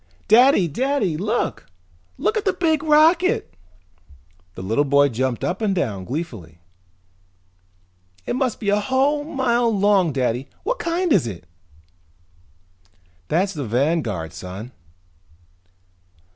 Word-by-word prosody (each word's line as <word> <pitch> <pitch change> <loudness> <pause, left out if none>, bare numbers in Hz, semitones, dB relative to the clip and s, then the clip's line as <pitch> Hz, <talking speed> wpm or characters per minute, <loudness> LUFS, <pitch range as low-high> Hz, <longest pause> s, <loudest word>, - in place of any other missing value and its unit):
"Daddy! 235 -4 +5
Daddy, 245 - -1
look! 210 +8 -2 0.5
Look - - 0
at 435 - -1
the 385 - +1
big 325 -4 +1
rocket!" 315 - +3 1.0
The - - -7
little 110 +9 +1
boy 140 0 +3
jumped 125 0 -2
up 185 +5 -2
and 205 -3 0
down 105 - -2
gleefully. 120 - -6 1.7
"It - - -2
must 255 -3 -1
be 205 - -2
a 205 +1 +3
whole 270 +6 +1
mile 245 -5 0
long, 200 -5 +2
Daddy! 130 -1 -2
What - - -2
kind 340 -1 0
is 155 -11 +2
it?" 90 -7 -8 1.8
"That's 190 +5 0
the 150 -4 -4
Vanguard, 120 - -1
son." 95 +7 -8
190 Hz, 115 wpm, -21 LUFS, -, 1.8 s, Daddy